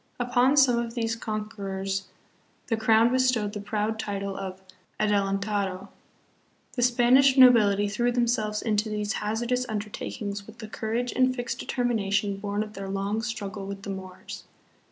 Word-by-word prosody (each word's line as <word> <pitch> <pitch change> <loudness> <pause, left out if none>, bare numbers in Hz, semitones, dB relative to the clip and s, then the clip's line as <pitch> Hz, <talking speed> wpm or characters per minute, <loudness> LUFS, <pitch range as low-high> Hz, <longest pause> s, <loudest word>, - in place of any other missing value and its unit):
Upon 245 +3 +3
some 250 -4 +5
of 235 0 -4
these 225 -2 -1
conquerors 195 -3 -4 0.6
the 225 - +2
crown 225 +1 +4
bestowed 250 -5 +1
the 205 - -5
proud 215 +1 -2
title 200 -2 -3
of 190 -1 -6 0.2
" 185 - -39
adelantado." 200 -2 0 0.8
The 245 - -2
Spanish 250 +3 +5
nobility 210 -6 +6
threw 240 +4 0
themselves 230 -3 0
into 215 -1 0
these 210 0 -2
hazardous 235 +4 -1
undertakings 205 -1 -5
with 220 +1 -13
the 215 - -8
courage 225 +3 -2
and 255 0 +2
fixed 245 -1 -4
determination 205 -5 0
born 205 +1 -2
of 210 0 -10
their 195 -1 -6
long 200 +3 -1
struggle 210 -3 -5
with 200 0 -7
the 200 - -4
Moors. 185 -1 -8
215 Hz, 150 wpm, -26 LUFS, 200-240 Hz, 0.8 s, nobility